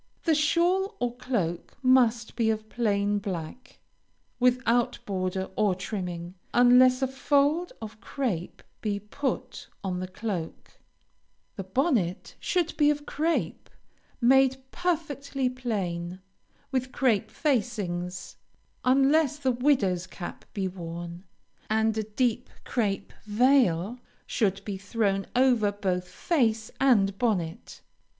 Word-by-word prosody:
The 325 - +3
shawl 350 +7 +2
or 245 -1 -1
cloak 190 -10 -3
must 240 -3 +3
be 230 -2 +2
of 215 0 -2
plain 205 -3 +1
black, 190 +3 -6 0.6
without 245 -1 +2
border 190 -1 -2
or 205 -3 +2
trimming, 180 -3 -5 0.2
unless 250 +1 +6
a - - +3
fold 285 +6 +1
of 215 -1 -9
crape 200 - -3 0.2
be 205 -2 -1
put 260 +7 -4 0.2
on 185 -2 -2
the 185 - -4
cloak; 185 -3 -5 0.8
the 195 - -5
bonnet 195 - 0
should 350 -3 0
be 295 -1 +5
of 295 0 -1
crape, 325 +3 -1 0.5
made 265 +1 +5
perfectly 285 -6 -1
plain, 185 -8 -3 0.5
with 260 -1 -1
crape 240 -8 +1
facings, 200 - -2 0.5
unless 275 +3 +4
the 270 -3 +1
widow's 235 -9 +1
cap 175 - -8
be 195 -2 0
worn, 170 0 -7 0.4
and 220 0 +2
a 220 - 0
deep 235 +3 -1
crape 205 -5 -2
veil 225 -3 +3 0.3
should 195 -2 0
be 200 -2 -3
thrown 200 -1 0
over 245 -5 +4
both 185 -3 -2
face 225 - 0
and 200 -7 +3
bonnet. 200 -5 -2
225 Hz, 115 wpm, -27 LUFS, 190-265 Hz, 0.8 s, unless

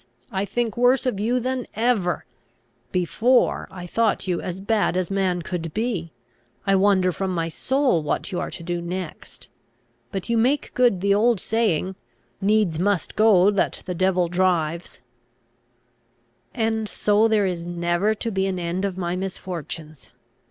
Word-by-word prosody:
I 195 +1 -1
think 235 +1 -2
worse 245 +2 +3
of 245 -6 -1
you 240 +4 +1
than 255 0 -2
ever! 220 -6 +1 0.7
Before, 220 +8 +2
I 180 -2 -8
thought 220 +3 0
you 180 -2 0
as 180 0 -5
bad 205 -2 +1
as 185 +1 -1
man 185 -3 0
could 165 -2 -5
be. 210 -8 -2 0.5
I 195 -1 +3
wonder 190 -1 +3
from 190 +2 -3
my 165 -1 -1
soul 260 - +1
what 150 - -2
you 180 - -2
are - - -3
to 170 - -7
do 175 0 -2
next. 180 -1 -7 0.6
But 195 - -4
you 235 -1 +2
make 270 +5 +1
good 240 -7 +3
the 200 0 +3
old 220 +1 +3
saying, 190 -4 0 0.5
'Needs 200 -5 +2
must 195 -1 0
go, 205 -3 +5
that 200 - -1
the 180 - -3
devil 185 0 +2
drives.'" 170 -3 0 1.5
"And 220 -2 -1
so 210 +2 +3
there 215 -2 +2
is 175 -3 -2
never 175 +4 0
to 230 +2 -3
be 190 -1 0
an 190 -1 -2
end 175 +2 -2
of 190 -2 -3
my 175 -1 -2
misfortunes! 170 -5 -6
190 Hz, 160 wpm, -23 LUFS, 175-220 Hz, 1.5 s, go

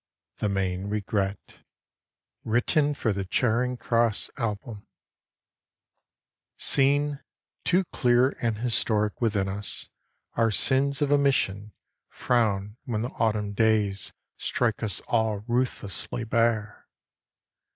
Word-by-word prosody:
THE 105 - -1
MAIN 95 0 -1
REGRET 100 -1 -3 0.8
WRITTEN 145 +6 +2
FOR 110 -6 0
THE 100 0 -3
CHARING 120 +5 +1
CROSS 115 -2 +1
ALBUM 110 0 -4
I - - -26 1.7
SEEN, 145 +1 +2 0.4
too 180 +2 +3
clear 125 +1 +3
and 115 -2 0
historic 110 -2 0
within 105 -4 +1
us, 100 +2 -4 0.4
our 115 -1 +2
sins 135 +6 +2
of 145 - 0
omission 120 -8 +1 0.4
Frown 105 -3 0
when 110 -3 -2
the 120 - -2
Autumn 105 -4 -1
days 105 -2 +1 0.3
strike 120 -3 -1
us 110 -4 -1
all 110 -3 0
ruthlessly 120 -2 -2
bare. 115 -2 0
110 Hz, 105 wpm, -26 LUFS, 105-125 Hz, 1.7 s, too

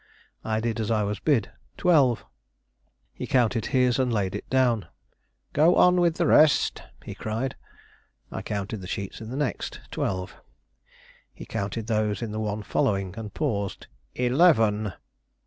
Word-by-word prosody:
I 110 -1 -1
did 115 0 -2
as 110 - -2
I 110 -2 +2
was 100 0 -2
bid. 135 -9 +1 0.3
"Twelve." 140 -10 +3 0.9
He - - -6
counted 115 -4 +2
his 125 -2 +2
and 130 -2 +1
laid 100 -4 0
it 105 - -6
down. 125 -6 +2 0.7
"Go 160 +5 +5
on 180 0 +5
with 170 -2 +3
the 170 - +1
rest," 155 -1 +4 0.2
he - - -7
cried. 115 +5 -3 0.8
I - - -4
counted 100 0 -4
the 90 - -8
sheets 100 +3 -5
in 110 - -7
the 130 - -5
next; 145 -3 -3
twelve. 95 -1 -3 0.9
He - - -11
counted 105 +3 -3
those 110 -2 0
in 110 - -4
the 110 - -3
one 105 -1 -3
following, 95 -3 0
and 110 -2 -7
paused. 100 - -2 0.3
"Eleven!" 120 - +3
110 Hz, 150 wpm, -26 LUFS, 105-130 Hz, 0.9 s, Go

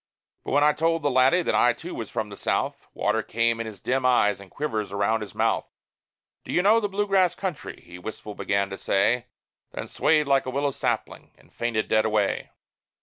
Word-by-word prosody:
But - - -4
when 145 +1 +4
I 150 0 +5
told 165 +1 0
the 145 - +2
laddie 130 +8 +4
that - - 0
I 120 - +4
too 175 +8 -8
was 115 - -5
from 110 - -3
the 100 - -8
South, - - -2
Water - - +1
came 115 0 0
in 115 - -3
his 105 -3 -9
dim 130 +1 0
eyes, 105 -6 +3
and 100 -1 -13
quivers 110 -8 -3
around 100 +3 +1
his 105 - -8
mouth. - - +1 0.8
"Do - - -7
you 180 - +2
know 215 +3 +5
the 205 -2 -2
Blue 205 +1 0
Grass 190 -3 +3
country?" 185 -7 -5
he 90 0 -11
wistful 105 +2 -7
began 100 -1 -1
to 95 - -6
say; 120 +5 +1 0.5
Then - - -5
swayed 155 -1 +2
like 135 -1 +2
a - - -1
willow 140 +2 0
sapling, - - -3
and - - -24
fainted 115 -2 -1
dead 110 0 +3
away. 105 -2 0
125 Hz, 210 wpm, -25 LUFS, 105-150 Hz, 0.8 s, I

